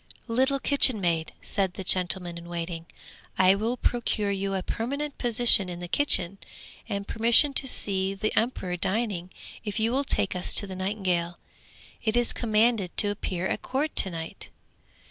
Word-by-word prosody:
'Little 265 +4 +1
kitchen 270 -5 +4
maid,' 165 -4 -1
said 190 -3 0
the 190 - -6
gentleman 180 -1 +1
in 170 0 -10
waiting, 170 -1 -5 0.5
'I 185 0 +5
will 225 +5 -2
procure 225 -4 -1
you 195 0 -2
a 190 - -3
permanent 280 +5 -4
position 235 -5 +5
in 175 -1 -7
the 175 - -7
kitchen, 195 -5 +2 0.5
and 200 0 -4
permission 235 +6 +4
to 270 - +2
see 195 -5 0
the 215 +2 -3
emperor 220 -6 -1
dining, 190 -2 -2 0.3
if 210 0 -3
you 225 +1 +1
will 270 +3 0
take 205 -8 -2
us 180 - -1
to - - +3
the 190 -1 -8
nightingale. 185 -3 -2 0.7
It 220 0 0
is 240 -1 +1
commanded 220 -4 0
to 205 - +3
appear 185 -3 -4
at - - -2
court 290 +4 -3
to 190 - +6
night.' 165 -2 -8
200 Hz, 165 wpm, -26 LUFS, 180-235 Hz, 0.7 s, to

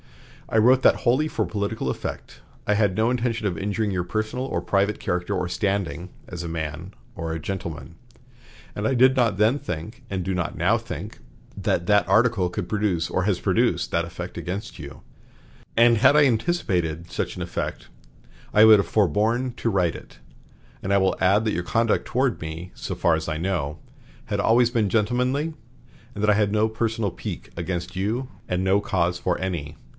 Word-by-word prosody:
I - - +1
wrote 125 +4 +5
that - - +4
wholly 130 +6 +3
for 110 -7 -1
political 100 -4 -2
effect; 65 - -6 0.3
I 105 - +3
had 105 -3 +2
no 110 +3 +2
intention 115 -3 0
of 90 - -2
injuring 105 +1 -1
your 90 -2 -1
personal 110 +7 -2
or 135 - -2
private 100 +4 0
character 90 +3 -2
or 90 -2 -1
standing 95 -2 -2 0.2
as 85 -2 -6
a 85 - -4
man 80 +3 -5 0.2
or 80 0 -4
a 80 - -3
gentleman; 85 -1 -6 0.8
and 105 - -3
I 120 - +2
did 130 +2 +5
not 115 -7 +2
then 110 +7 +3
think, 110 - -6
and 95 -3 -3
do 95 - -1
not 90 -2 -2
now - - +3
think, - - -7 0.4
that 85 - -1
that 105 +1 +3
article 110 -3 +3
could 90 +1 -4
produce 95 -4 0
or 95 - 0
has 100 -2 +1
produced - - +1
that 85 - +1
effect 85 +1 -7
against 100 +6 -5
you, 70 -4 -9 0.8
and 115 -1 +6
had 145 +6 +6
I 150 - +7
anticipated 90 - 0
such - - -3
an - - -5
effect - - -4 0.7
I 105 +1 +7
would 110 -2 +8
have 100 - 0
forborne 110 - +1
to 115 - -2
write 90 -5 +1
it. - - -12 0.7
And 95 - -2
I 100 - +5
will 95 -1 +2
add 100 +4 +4
that 110 - +1
your 85 - -1
conduct 115 +3 +1
toward 125 -1 0
me, 80 +3 -6
so - - -5
far 85 - +3
as 80 0 -3
I 80 - -2
know, 80 -4 -2 0.5
had - - -1
always 120 +1 +4
been 110 -5 +1
gentlemanly, 125 - +1 0.6
and 105 - -5
that 105 - +3
I - - +5
had 100 -1 +2
no 110 +1 +3
personal 110 -2 -1
pique - - -7
against 85 +2 -4
you 110 +7 -1 0.2
and 90 +1 0
no 95 +2 +3
cause 85 -3 0
for 90 0 -1
any.... 85 -6 -4
100 Hz, 190 wpm, -24 LUFS, 90-115 Hz, 0.8 s, would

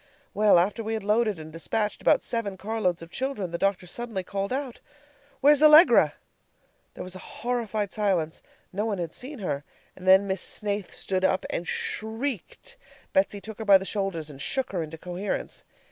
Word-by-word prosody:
Well, 210 -2 +5
after 195 +6 +1
we 220 +1 -2
had 220 - -4
loaded 215 -1 +2
and 155 0 -10
despatched 210 +6 -2
about - - +4
seven 210 -5 -3
car 220 +4 -4
loads 180 -4 0
of 165 - -12
children, 255 -9 -3
the 170 - -3
doctor 195 -2 +1
suddenly 215 +1 -4
called 195 +2 -3
out: 265 -2 -3 0.6
"Where's 290 +1 +6
Allegra?" 310 +3 +7 0.8
There - - -6
was 185 0 -8
a - - -8
horrified 220 -3 -3
silence. 185 -7 0 0.3
No 210 +4 -1
one 205 -3 -1
had 170 -2 -4
seen 275 +3 -6
her. 150 - -3 0.3
And 185 - -10
then 190 +1 +7
Miss 190 -2 -2
Snaith 205 -2 -4
stood 185 -1 -2
up 190 0 +2
and 175 - -3
SHRIEKED. 230 - -4 0.4
Betsy 285 -8 +2
took 220 +1 -9
her 220 - -4
by 200 -2 +8
the 190 - -7
shoulders, 195 -7 -2
and 140 -1 -10
shook 265 - -1
her 180 -3 -1
into 160 0 -6
coherence. 180 +4 -4
200 Hz, 185 wpm, -26 LUFS, 185-225 Hz, 0.8 s, by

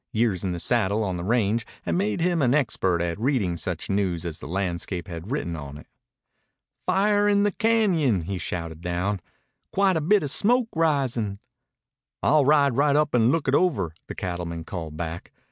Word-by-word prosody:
Years 110 -5 +1
in 95 - -1
the 85 - -3
saddle 110 0 +1
on 95 -3 -2
the 85 - -5
range 110 +1 +1 0.2
had 85 - -2
made 100 - 0
him 175 -1 +1
an 130 0 +3
expert 95 - +1
at 85 +2 -3
reading 115 -8 +1
such 85 -1 -4
news 95 -4 -1
as 80 -2 -5
the - - -8
landscape 90 0 -3
had 85 +2 -7
written 120 - -2
on 70 -2 -8
it. 75 - -13 1.0
"Fire 205 +2 +3
in 200 0 +3
Bear 205 - +2
Cañon!" 185 - +2
he 95 +2 -4
shouted 85 -2 -5
down. 90 +3 -1 0.5
"Quite 195 -3 +3
a - - -1
bit 195 +5 +3
of 140 - -1
smoke 240 +5 +3
risin'." 135 -10 0 0.9
"I'll 150 -1 +4
ride 140 -3 +4
right 145 +1 +3
up 150 0 +2
and 120 0 +4
look 165 -2 0
it 130 - +2
over," 145 - +1
the - - -7
cattleman 85 -2 -4
called 80 -3 -6
back. 85 0 -5
105 Hz, 185 wpm, -25 LUFS, -, 1.0 s, I'll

